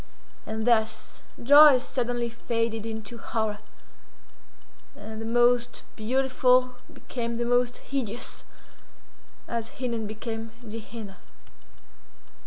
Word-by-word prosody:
And 220 0 -3
thus, 220 -2 +1 0.2
joy 285 +1 +9
suddenly 245 -1 -2
faded 230 -1 -2
into 220 +1 -6
horror, 220 -3 -2 1.4
and 220 +2 -8
the - - -5
most 240 0 +2
beautiful 255 +1 +2 0.2
became 235 -2 -5
the 240 +1 -1
most 245 0 +2
hideous, 245 -4 -4 1.0
as 230 -1 -3
Hinnon 235 -4 -2
became 225 +1 -6
Ge 220 +1 -6
Henna. 210 -4 -9
235 Hz, 95 wpm, -27 LUFS, 220-245 Hz, 1.4 s, joy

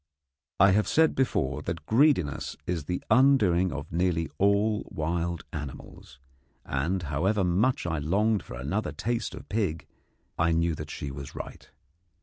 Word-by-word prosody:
I 100 0 +7
have 105 +2 +2
said 160 0 +4
before 75 - 0
that 85 +2 -5
greediness 115 - +2
is 85 -5 -2
the 90 +4 -3
undoing 105 -10 +4
of 70 0 -6
nearly 85 -1 0
all 100 +2 +2
wild 85 +1 -2
animals, 70 -3 -8 0.5
and, 85 +8 -1
however 95 +8 0
much 95 +9 +1
I 85 -3 -1
longed 100 +8 +1
for - - -9
another 75 - -2
taste 120 0 -2
of - - -11
pig, 100 -7 -1 0.5
I 85 0 +3
knew 85 +1 +1
that 75 -1 -6
she 70 -1 -5
was 70 0 -8
right. - - -8
85 Hz, 145 wpm, -27 LUFS, 75-105 Hz, 0.5 s, I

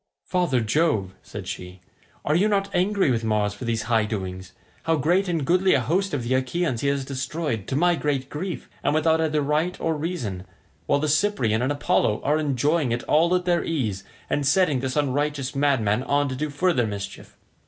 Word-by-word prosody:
"Father 175 -9 +1
Jove," 110 - +1
said - - -8
she, 90 +1 -7 0.5
"are 150 - +2
you 185 +6 +3
not 200 -1 0
angry 190 -4 +2
with 115 -2 0
Mars 105 -2 +1
for 105 +4 -8
these 115 -2 -1
high 115 -2 +2
doings? 95 -3 -5 0.3
how 165 0 +3
great 175 +7 +2
and 165 -5 -1
goodly 185 +4 +3
a - - +3
host 185 +9 0
of 140 -4 -2
the 120 +2 -1
Achaeans 130 0 0
he 140 - 0
has 140 -1 0
destroyed 135 - -3
to - - -2
my 175 +4 +3
great 145 -5 -1
grief, 170 +6 -5 0.2
and 145 - +1
without 160 +1 +3
either 155 -2 +1
right 155 +5 0
or 165 -1 0
reason, 125 - -4 0.4
while 145 - +3
the 150 +2 -1
Cyprian 145 - +1
and 130 +3 +1
Apollo 125 -6 +1
are 150 +2 +2
enjoying 145 0 +1
it 120 +1 -1
all 170 +4 +3
at 180 0 -1
their 175 -1 +2
ease 110 -12 -2 0.2
and 145 - 0
setting 145 -1 +3
this 130 0 -3
unrighteous 145 -1 -1
madman 130 -6 +2
on 145 +2 +1
to 130 - -3
do 150 +3 -2
further 145 -4 +1
mischief. 100 -1 -7
145 Hz, 195 wpm, -24 LUFS, 120-165 Hz, 0.5 s, you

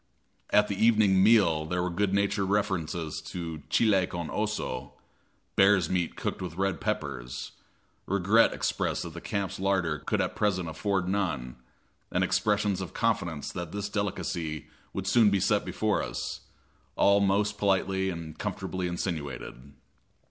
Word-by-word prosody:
At 105 0 +4
the 100 +1 -1
evening 105 -4 +5
meal 95 -7 +5
there 90 +1 -1
were 90 - -1
good 100 +2 0
natured 100 0 +1
references 85 -6 -1
to 80 -3 -5
chile 100 -5 +3
con 85 -2 -5
oso 65 - -3 0.6
bear's 95 -4 +4
meat 90 -3 0
cooked - - -3
with 90 -3 -5
red 95 -1 0
peppers - - -3 0.6
regret 100 +4 +4
expressed - - -1
that 85 -2 -7
the 85 - -8
camp's 100 -3 -3
larder 95 -6 +1
could - - -1
at - - -1
present 95 -4 0
afford 95 +3 -1
none, 80 -12 -2 0.5
and - - +2
expressions 105 -2 +1
of 95 - -7
confidence 90 -10 -1
that 85 -1 -6
this 100 0 -3
delicacy 90 -6 -3 0.2
would 95 - -4
soon 105 +2 +5
be 100 -1 +2
set 105 +2 +2
before 110 -1 0
us - - -4 0.6
all 100 0 +5
most 100 +1 +1
politely 95 -1 +1
and 85 -3 -7
comfortably 95 -1 -3
insinuated. 70 -7 -5
95 Hz, 145 wpm, -28 LUFS, 85-100 Hz, 0.6 s, evening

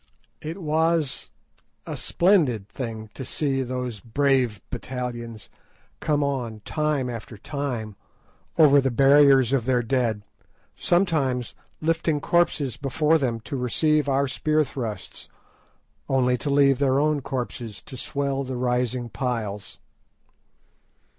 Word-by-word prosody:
It 160 +5 -6
was 160 -2 0 0.6
a - - -5
splendid 155 - +2
thing 110 -3 -6
to 130 - -6
see 135 0 -1
those 125 -3 -4
brave 125 -2 +1
battalions 120 -3 -5 0.5
come 150 -1 +1
on 125 -6 -3
time 150 +2 -1
after 115 -2 -7
time 120 -4 -4 0.6
over 145 -3 +7
the 135 - +1
barriers 135 0 +5
of 130 -4 +1
their 125 -2 +2
dead, 115 -4 0 0.5
sometimes 145 - +1 0.3
lifting 160 -1 +1
corpses 150 -5 +1
before 150 +4 +2
them 120 -5 -1
to 110 +5 -6
receive 145 +4 +1
our 140 +1 +2
spear 155 +4 +1
thrusts, 115 -8 -6 0.8
only 125 -2 +3
to 125 +4 -3
leave 140 -2 +4
their 135 -1 +3
own 150 -1 +1
corpses 120 -5 -5
to - - -10
swell 140 +2 -2
the 130 -1 -5
rising 125 0 0
piles. 110 -6 -4
130 Hz, 120 wpm, -24 LUFS, 120-145 Hz, 0.8 s, over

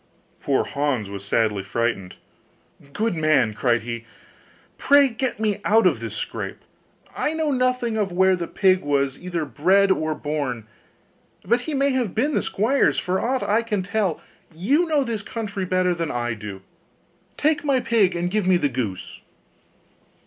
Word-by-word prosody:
Poor 140 -2 +1
Hans 140 -8 -2
was 100 -1 -7
sadly 105 0 +1
frightened. 95 -2 -2 0.8
'Good 220 +7 -1
man,' 155 -8 +2
cried 120 +1 +1
he, 115 0 -5 0.8
'pray 285 -1 +5
get 245 +1 -3
me 210 -2 -1
out 225 +2 +4
of - - +3
this - - -6
scrape. - - -5 0.6
I 310 - -1
know 315 -2 0
nothing 250 -3 0
of 205 -3 0
where 190 +1 +3
the 170 -2 -4
pig 190 -1 +2
was 140 -2 0
either 175 -3 -3
bred 190 - +3
or 155 -4 0
born; 145 -8 -3 0.8
but 240 +1 +2
he 300 +3 -4
may 275 +1 +2
have 250 -7 -1
been 285 +7 +1
the - - +2
squire's 240 +8 +1
for 185 0 -1
aught 260 +2 0
I 215 +3 +2
can 210 -5 -2
tell: 200 -3 -1 0.4
you 275 - +2
know 300 -3 +2
this 230 -4 -3
country 205 -3 -4
better 185 0 +1
than 165 -2 -3
I 120 -1 -2
do, 105 -3 -8 0.7
take 305 +1 +1
my 275 -3 +2
pig 215 -7 +2
and 175 +1 -2
give 210 -2 0
me 185 -1 +5
the 145 -4 0
goose. 115 -8 -5
185 Hz, 165 wpm, -23 LUFS, 140-230 Hz, 0.8 s, pray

